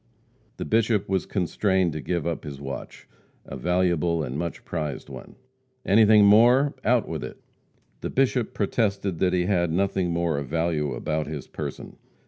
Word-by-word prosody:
The - - -4
Bishop 110 -2 +1
was 95 -1 -1
constrained 95 -2 0
to 75 - -5
give 85 0 -2
up 85 -1 -3
his 70 -3 -7
watch 70 -1 -8 0.4
a - - -8
valuable 90 -2 +1
and 65 -2 -5
much 85 +2 -4
prized 75 -5 -4
one. - - -10 0.5
"Anything 105 +1 +6
more? 120 +7 +5
Out - - +2
with - - -4
it." - - -8 0.6
The - - -4
Bishop 130 -3 0
protested 100 -4 -1
that 90 -1 +2
he 90 -1 +1
had 90 -3 +1
nothing 95 0 0
more 85 -3 0
of 70 - -6
value 80 -2 -1
about 75 0 -2
his 75 -3 -6
person. - - -7
90 Hz, 160 wpm, -25 LUFS, 80-100 Hz, 0.6 s, Anything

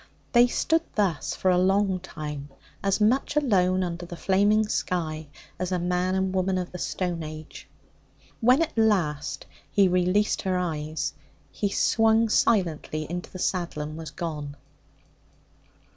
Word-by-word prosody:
They 240 0 +6
stood 320 +6 +1
thus 195 -7 0
for 185 - +2
a 180 - +3
long 190 0 +2
time, 150 -5 -7 0.3
as 195 +1 +1
much 245 +7 +2
alone 185 -10 +2
under 175 0 -4
the 175 0 -8
flaming 205 +4 +3
sky 160 -6 -2 0.3
as 185 0 -2
a 180 - +1
man 180 +1 0
and 190 0 0
woman 185 0 +1
of 180 -1 -3
the 180 - -7
stone 175 -2 -2
age. 155 0 -9 0.7
When 255 +7 +5
at 330 - -5
least 175 -10 +1 0.2
he 200 -2 +4
released 180 +3 +2
her 185 -1 0
eyes, 155 -3 -2 0.4
he 205 - -1
swung 225 +2 +3
silently 165 -8 +1
into 175 0 -4
the - - -9
saddle 175 -4 -2
and 155 +1 -6
was 160 -1 -7
gone. 150 -3 -5
185 Hz, 145 wpm, -26 LUFS, 165-205 Hz, 0.7 s, They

